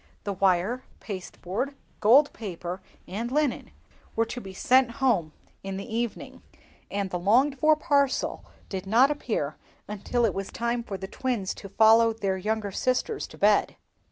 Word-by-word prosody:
The 200 - -2
wire, 195 +6 +1 0.2
pasteboard, 200 +6 -5 0.2
gold 270 +8 +6
paper, 185 -3 -6 0.3
and 225 +6 -4
linen 295 -2 0 0.5
were 225 - +2
to 240 +2 -6
be 195 - -8
sent 250 +5 +3
home 235 - +1 0.3
in 195 0 -5
the 195 - -5
evening, 235 -1 -4 0.5
and 200 -1 -2
the 180 - -2
longed 255 +9 +3
for 310 +2 +5
parcel 280 -2 +1 0.2
did 190 -1 -5
not 245 +7 +5
appear 215 - -2 0.3
until 210 +4 0
it 215 - +1
was 195 0 -4
time 235 +1 -1
for 205 -4 -6
the 190 - -6
twins 230 -4 -2
to 200 - -10
follow 225 +2 +5
their 200 -4 -1
younger 210 +1 -2
sisters 255 - -1
to - - -14
bed. - - +3
220 Hz, 155 wpm, -27 LUFS, 195-255 Hz, 0.5 s, gold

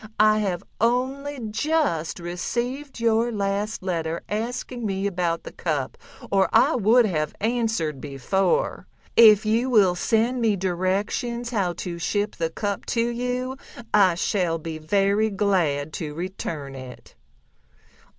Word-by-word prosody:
I 215 0 +5
have 190 -3 -1 0.2
only 265 +4 0
just 245 - 0
received 240 +11 -4
your 230 +1 +2
last 205 0 -2
letter 165 -3 -2
asking 240 +3 -3
me 195 -2 -1
about 175 -4 -1
the - - -8
cup, 145 -6 -2 0.4
or 195 -1 +3
I 225 - +5
would 235 +1 +4
have 155 -7 -1
answered 220 - -1
before. 190 - 0 0.3
If 215 -2 +7
you 230 +4 +1
will 205 -7 +5
send 230 +7 +1
me 220 -3 +3
directions 195 +7 -1
how 195 -6 0
to 170 -1 -6
ship 205 +4 -1
the 165 -1 0
cup 200 +4 -4
to 230 +1 +2
you 250 +2 -2 0.4
I 190 -4 +5
shall 175 -2 0
be 160 0 -6
very 200 +6 +2
glad 170 -8 0
to 150 -2 -5
return 165 -5 -5
it." 130 -2 -11
200 Hz, 130 wpm, -24 LUFS, 175-235 Hz, 0.4 s, If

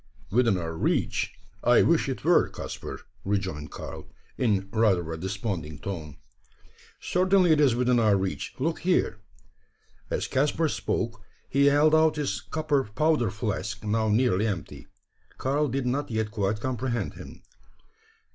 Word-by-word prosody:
"Within 115 -3 +3
our 80 -2 -4
reach? - - 0 0.3
I - - +5
wish - - +2
it - - -4
were, - - +4
Caspar," - - -7 0.2
rejoined 95 -7 -2
Karl, - - -8 0.3
in 100 -6 +1
rather 95 -7 +2
a - - -4
desponding 95 -5 -4
tone. 80 -5 -6 0.8
"Certainly 185 -1 +3
it 155 -1 +4
is 135 -5 +4
within 125 0 +2
our 105 -3 +4
reach. 95 0 -3
Look 160 +5 -1
here!" 175 -11 +1 0.9
As - - -1
Caspar 150 +4 +1
spoke, 115 -5 -2 0.3
he 140 +1 +3
held 145 +2 +4
out 160 0 +4
his 150 -2 -2
copper 150 -3 0
powder 125 +2 +1
flask, 110 0 -3
now 110 +1 +1
nearly 110 -2 +2
empty. 80 - -5 0.5
Karl 145 +3 +1
did 135 -1 -2
not 140 +4 -1
yet 110 -2 -1
quite 105 0 -1
comprehend 125 -3 -2
him. - - -12
115 Hz, 140 wpm, -27 LUFS, 100-140 Hz, 0.9 s, I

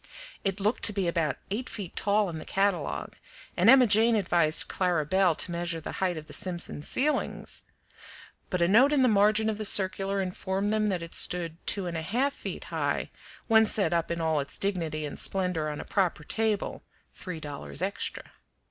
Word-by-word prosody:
It 195 0 -2
looked 210 +4 0
to 210 - +5
be 195 -3 -1
about 165 -5 0
eight 240 +5 -3
feet 195 -5 -6
tall 205 0 +2
in 165 -3 -5
the - - -8
catalogue, 195 -6 -1 0.4
and 185 +6 +4
Emma 260 0 +8
Jane 225 +1 +4
advised 170 -6 +2
Clara 175 -5 0
Belle 185 +1 +2
to 175 - -1
measure 170 -1 -2
the 155 - -6
height 180 -3 0
of 155 - -7
the - - -10
Simpson 175 -5 -2
ceilings; 285 - -1 0.9
but 180 -2 0
a - - +3
note 240 +9 +5
in 275 -3 +3
the - - +5
margin 215 0 +3
of 215 -1 -2
the - - -2
circular 195 0 +2
informed 190 +2 -2
them 215 0 +1
that 185 -4 -1
it 165 - -9
stood 170 -2 -2
two 200 -2 +1
and 170 -2 -3
a - - -3
half 245 - 0
feet - - -7
high - - -1 0.3
when 220 -1 +5
set 195 -5 +2
up 170 -1 0
in 170 - -2
all 160 -2 +1
its 140 - -5
dignity 165 -6 -1
and 145 - -7
splendor 180 -5 +1
on 150 - -5
a - - -7
proper 180 -6 0
table, 220 +4 -1 0.3
three 180 -4 -7
dollars 145 +2 -5
extra. 200 +1 -4
190 Hz, 195 wpm, -28 LUFS, 170-210 Hz, 0.9 s, Emma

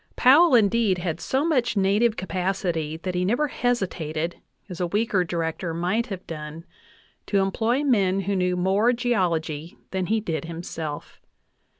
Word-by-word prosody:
Powell, 285 +3 +6
indeed, 220 -3 +3
had 170 -2 -3
so 270 +3 0
much 250 -9 +1
native 210 +4 +2
capacity 180 -4 -2
that 180 +3 -4
he 180 0 0
never 245 +10 +1
hesitated, 175 -10 -2 0.3
as 180 -4 -8
a 175 - +1
weaker 205 0 +1
Director 165 0 -3
might 190 +8 0
have 195 -5 -7
done, 155 +1 -7 0.6
to 200 - +1
employ 220 +7 +1
men 195 -8 +2
who 200 +1 -1
knew 180 -1 +1
more 195 +7 +2
geology 170 -10 -1
than 190 -1 -2
he 220 +1 +2
did 165 -6 -3
himself. 165 -2 -6
190 Hz, 150 wpm, -24 LUFS, 170-225 Hz, 0.6 s, Powell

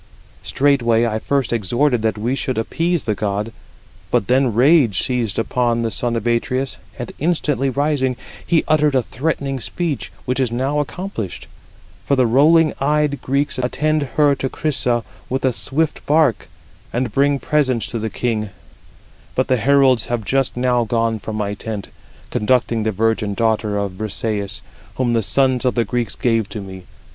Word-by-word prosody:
Straightway 120 -5 +2
I 110 -1 -1
first 135 -1 0
exhorted 120 +4 +1
that 110 -1 0
we 115 +5 -1
should 135 -2 -2
appease 165 +8 0
the 110 - 0
god; 105 +2 -2 0.6
but - - +1
then 130 +1 +2
rage 125 - +4
seized 120 -6 -1
upon 120 0 0
the 115 - -1
son 120 +1 -1
of 115 -1 -3
Atreus, 130 +3 0 0.2
and 120 - -5
instantly 150 -4 +1
rising, 135 -2 0 0.3
he 165 -2 +2
uttered 150 -2 +3
a 130 - +3
threatening 135 +2 -2
speech, 160 +4 -3
which 125 +1 -1
is 130 -3 +1
now 135 +5 0
accomplished; 145 - -4 0.6
for 140 - +1
the 130 -2 +3
rolling 155 +7 +4
eyed 150 0 +1
Greeks 140 0 0
attend 150 +3 0
her 145 -2 +5
to 135 -1 -2
Chrysa 125 -6 0 0.3
with 130 +1 -1
a 130 - +2
swift 150 +6 -1
bark, 150 -7 +2 0.4
and 120 -1 -1
bring 140 +4 +2
presents 130 -6 +1
to 115 - -3
the 110 +1 -2
king; 110 -2 -2 0.9
but 130 - 0
the 130 - +3
heralds 130 0 +3
have 120 -3 -2
just 135 +2 0
now 125 -1 +2
gone 115 0 0
from 110 +1 -6
my 105 -1 -2
tent, 105 -1 -6 0.4
conducting 115 0 +1
the 110 0 0
virgin 110 0 0
daughter 110 -2 0
of 100 -1 -1
Brisëis, 105 -1 -3 0.3
whom 125 -2 0
the 115 - +2
sons 130 +3 +2
of 125 - +1
the 120 -2 +1
Greeks 120 +2 -2
gave 115 -4 0
to 110 - -5
me. 95 -2 -9
125 Hz, 165 wpm, -19 LUFS, 110-140 Hz, 0.9 s, her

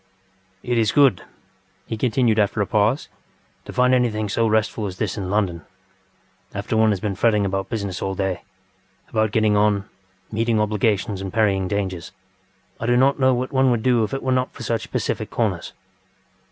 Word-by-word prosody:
ŌĆØ - - -9
ŌĆ£It 120 - +2
is 110 -2 +2
good, 140 -10 +5
ŌĆØ - - -14 0.6
he 115 - -4
continued 115 -1 +1
after 105 +1 +1
a 100 - +2
pause, 110 +7 +1 0.6
ŌĆ£to - - -7
find 125 0 +4
anything 110 -4 +1
so 115 +3 +1
restful 110 -1 0
as 95 -1 -7
this 100 -2 -2
in 95 -4 -4
London. 95 -5 0 0.9
After - - -2
one 110 0 +4
has 100 -3 0
been 105 0 -2
fretting 105 +1 +2
about 95 0 -2
business 100 -5 -3
all 95 0 -2
day, 95 -2 -2 0.7
about 110 -1 +1
getting 105 0 +2
on, 105 -1 +2 0.4
meeting 115 0 +1
obligations, 105 -2 0
and 95 -1 -5
parrying 100 -3 +1
dangers, 95 -3 -3 0.7
I 115 - -3
do 120 0 +3
not 135 +2 +3
know 130 -1 +4
what 125 +1 -3
one 130 -1 +3
would 120 -3 0
do 125 -3 +3
if 110 - -3
it 135 - -4
were 130 - 0
not 130 0 +1
for 125 - -9
such 115 -1 -2
pacific - - -2
corners. - - -2
110 Hz, 190 wpm, -22 LUFS, 100-120 Hz, 0.9 s, good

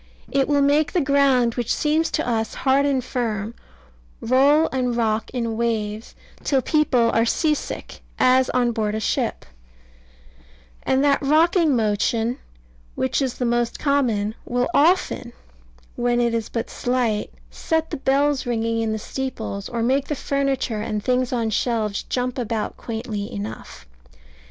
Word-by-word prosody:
It 275 -1 +2
will 285 -1 +3
make 290 +1 +2
the 360 - +3
ground, 275 -5 +3
which 240 -2 -2
seems 315 +2 +1
to 310 - -2
us 225 -2 0
so - - -10
hard 275 +1 +2
and 265 -3 0
firm, 225 -4 -3 0.7
roll 280 +6 +4
and 250 -2 -1
rock 220 -2 0
in 235 -3 -3
waves, 220 -2 -2 0.3
till 270 -3 +1
people 255 -7 +2
are 230 - +3
sea 305 +6 +2
sick, - - -6 0.2
as 255 0 +4
on 245 -1 +1
board 215 -2 -1
a - - -1
ship; 220 - -1 1.4
and 265 +1 +1
that 285 -1 +3
rocking 315 +1 +3
motion 225 +2 0 0.6
(which 130 - 0
is 260 -3 -1
the 250 - -2
most 240 0 0
common) 240 -8 +1
will 245 0 -1
often, 305 -6 +2 0.6
when 240 0 +1
it 235 -1 +1
is 230 -2 -2
but 230 - -4
slight, 245 -4 -1 0.2
set 320 0 -1
the - - -3
bells 275 0 +1
ringing 230 -1 0
in 220 -1 -1
the - - -2
steeples, 220 -4 -5
or 235 -1 -2
make 270 +3 +1
the 300 - -2
furniture, 270 -5 -1
and 210 -1 -3
things 255 +1 +1
on 230 -3 -1
shelves, 215 -2 0
jump 250 0 -3
about 225 -2 -2
quaintly 220 -3 -5
enough. 105 -7 -7
245 Hz, 155 wpm, -22 LUFS, 225-275 Hz, 1.4 s, roll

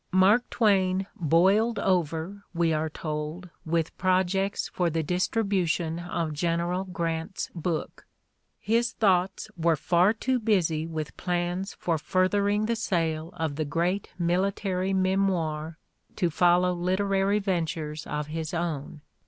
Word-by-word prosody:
Mark 195 +6 +4
Twain 190 -4 +2
"boiled 195 +6 +3
over," 175 +1 0
we 165 -1 +2
are 155 +1 0
told, 155 +3 -5 0.2
with 165 0 0
projects 190 +1 +1
for 175 -2 0
the 165 0 -1
distribution 180 -2 0
of 170 -2 -3
General 170 +4 -1
Grant's 165 -1 -3
book: 165 -1 -4 0.5
"his 230 +3 +1
thoughts 190 -2 +1
were 165 -1 +2
far 175 +6 +3
too 250 +3 0
busy 170 -8 +1
with 155 -2 -5
plans 180 +2 -2
for 165 -3 -1
furthering 200 +5 +1
the 230 +1 0
sale 165 -7 -1
of 160 -4 -3
the 155 - 0
great 170 +6 -1
military 185 +2 0
memoir 185 -5 0 0.4
to 175 -4 0
follow 180 +2 +3
literary 195 +3 +1
ven 185 -5 0
tures 155 -2 -5
of 150 0 -2
his 160 +2 -4
own. 155 -3 -3
175 Hz, 130 wpm, -27 LUFS, 160-195 Hz, 0.5 s, Mark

